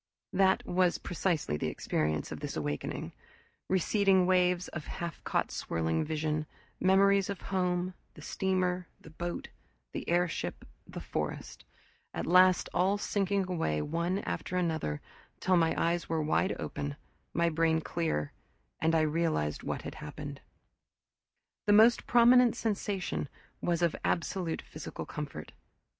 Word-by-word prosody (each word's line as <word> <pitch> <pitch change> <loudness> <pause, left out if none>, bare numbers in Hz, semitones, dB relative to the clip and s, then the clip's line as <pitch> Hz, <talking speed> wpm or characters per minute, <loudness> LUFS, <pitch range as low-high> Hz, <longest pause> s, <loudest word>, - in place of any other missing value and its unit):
That 190 0 +3
was 180 -1 +2
precisely 165 - -1
the - - -2
experience 75 0 -1
of - - -5
this - - -4
awakening: 75 -1 -3 0.6
receding 190 0 +3
waves 180 -1 +3
of 155 - -7
half 170 -1 -5
caught - - 0
swirling 80 -1 -1
vision, 155 0 -1 0.3
memories 195 +1 +4
of 200 -3 -4
home, 180 0 0 0.2
the - - -12
steamer, 185 -2 0
the 160 - -14
boat, 175 +2 -5 0.4
the - - -4
airship, 170 - 0 0.2
the - - -7
forest - - -4 0.5
at - - -2
last 185 +1 +5
all 190 +3 +2
sinking 200 -1 0
away 160 - 0
one 170 - -1
after 180 - -3
another, 160 - -1 0.4
till 185 0 +3
my 165 -2 +3
eyes 170 +1 0
were 160 -1 0
wide 160 +5 +1
open, 145 0 -4 0.4
my 170 0 +2
brain 160 0 +2
clear, 160 - -2 0.5
and 160 +1 +3
I 160 - +4
realized 155 - 0
what - - -4
had - - -6
happened. 145 -1 -7 1.3
The 205 - +6
most 225 +3 +6
prominent 245 0 +6
sensation 195 - -2 0.3
was 175 0 0
of 170 - +2
absolute 170 -1 -1
physical - - -7
comfort. - - -6
175 Hz, 135 wpm, -31 LUFS, 155-185 Hz, 1.3 s, The